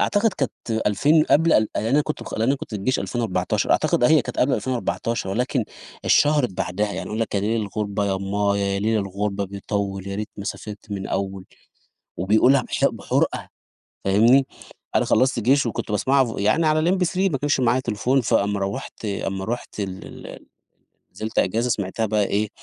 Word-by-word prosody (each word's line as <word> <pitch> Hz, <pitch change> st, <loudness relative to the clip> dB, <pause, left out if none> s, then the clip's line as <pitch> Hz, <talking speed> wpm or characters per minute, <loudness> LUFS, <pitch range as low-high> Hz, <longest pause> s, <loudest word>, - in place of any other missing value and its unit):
أعتقد 205 Hz, 0 st, +2 dB
كانت 135 Hz, -, -2 dB, 0.3 s
ألفين 150 Hz, -, +4 dB
قبل 165 Hz, +3 st, +3 dB
ال 110 Hz, -1 st, +4 dB
يعني 110 Hz, +3 st, -1 dB
أنا 145 Hz, -, +4 dB
كُنت 150 Hz, -, -5 dB
أنا 115 Hz, +6 st, +2 dB
كُنت -, -, -9 dB
في 105 Hz, -, -3 dB
الجيش 130 Hz, +7 st, 0 dB
2014 115 Hz, -6 st, -1 dB
أعتقد 120 Hz, -, +2 dB
أهي 155 Hz, +2 st, +5 dB
كانت -, -, -7 dB
قبل 130 Hz, +2 st, +3 dB
2014 120 Hz, -4 st, -2 dB
ولكن، 125 Hz, +2 st, 0 dB, 0.4 s
اتشهرت 145 Hz, -5 st, +4 dB
بعدها، 95 Hz, +3 st, -2 dB
يعني -, -, -5 dB
يقول 110 Hz, +2 st, -4 dB
لك 110 Hz, -, -2 dB
يا 100 Hz, -, +2 dB
لِيل 110 Hz, +2 st, 0 dB
الغُربة 100 Hz, 0 st, -2 dB
يا 95 Hz, -, 0 dB
امآيا 100 Hz, +1 st, 0 dB
يا -, -, -1 dB
لِيل 110 Hz, +1 st, +1 dB
الغُربة 100 Hz, +1 st, -2 dB
بيطول 100 Hz, 0 st, -4 dB
يا 100 Hz, -, -4 dB
ريت 105 Hz, 0 st, -4 dB
ما 100 Hz, -, -6 dB
سافرت 105 Hz, +1 st, -7 dB
من 100 Hz, -, -2 dB
الأوّل، 95 Hz, 0 st, -3 dB, 0.7 s
وبيقولها 110 Hz, +8 st, +4 dB
بح -, -, -2 dB
بِحرقة، -, -, -1 dB, 0.6 s
فاهمني، 115 Hz, +8 st, +5 dB, 0.5 s
أنا -, -, +3 dB
خلصت 130 Hz, -2 st, +2 dB
جيش 135 Hz, +3 st, +3 dB
وكُنت 110 Hz, -, -4 dB
باسمعها 135 Hz, +5 st, +3 dB
ف 115 Hz, -4 st, -5 dB
يعني 110 Hz, +11 st, +2 dB
على 155 Hz, +3 st, +3 dB
الMP3 180 Hz, -1 st, 0 dB, 0.2 s
ما 135 Hz, -, 0 dB
كانش 145 Hz, -1 st, +1 dB
معايا 125 Hz, +1 st, +2 dB
تليفون 125 Hz, +3 st, 0 dB
فأما 100 Hz, -3 st, +1 dB
روّحت 100 Hz, +3 st, -5 dB
أمّا 95 Hz, -1 st, -3 dB
رُحت 115 Hz, -1 st, -5 dB
ال 95 Hz, -1 st, -5 dB
ال -, -, -10 dB
ال -, -, -11 dB, 0.7 s
نزلت 110 Hz, +4 st, -2 dB
أجازة 115 Hz, +6 st, +1 dB
سمعتها 105 Hz, +1 st, -1 dB
بقى 105 Hz, -1 st, +1 dB
إيه، 105 Hz, +1 st, 0 dB
110 Hz, 180 wpm, -23 LUFS, 100-130 Hz, 0.7 s, أهي